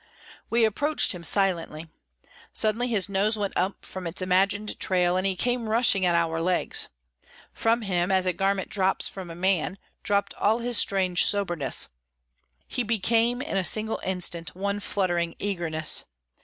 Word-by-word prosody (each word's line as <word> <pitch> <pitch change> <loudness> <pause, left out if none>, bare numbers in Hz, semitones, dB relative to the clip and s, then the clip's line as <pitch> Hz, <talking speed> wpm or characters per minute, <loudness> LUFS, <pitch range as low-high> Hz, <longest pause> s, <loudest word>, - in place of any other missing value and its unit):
We 230 0 +3
approached 290 +8 +1
him 175 -2 -9
silently. 170 -3 0 0.7
Suddenly 220 +3 +1
his 210 -6 0
nose 200 +3 +1
went 200 -2 -2
up 190 +2 -2
from 185 -2 -7
its 165 - -3
imagined 195 +3 0
trail, 180 -1 +2
and 185 +1 +1
he 190 - 0
came 245 +2 -1
rushing 215 -5 +3
at 175 - +2
our 165 -1 0
legs. 180 +1 0 0.7
From 230 +1 +1
him, 180 -1 0
as 190 -1 +2
a 185 - +1
garment 195 0 -1
drops 190 -1 +1
from 190 -3 -8
a 165 - -8
man, 185 0 0 0.2
dropped 200 -1 0
all 215 +2 +1
his 240 0 0
strange 185 -2 +3
soberness; 175 - 0 0.8
he - - -2
became 230 +3 +1
in 285 - -3
a 190 - +1
single 220 +4 +1
instant 175 -3 -2
one 200 +2 -2
fluttering 175 -4 -1
eagerness. 170 -6 -1
195 Hz, 155 wpm, -26 LUFS, 180-215 Hz, 0.8 s, We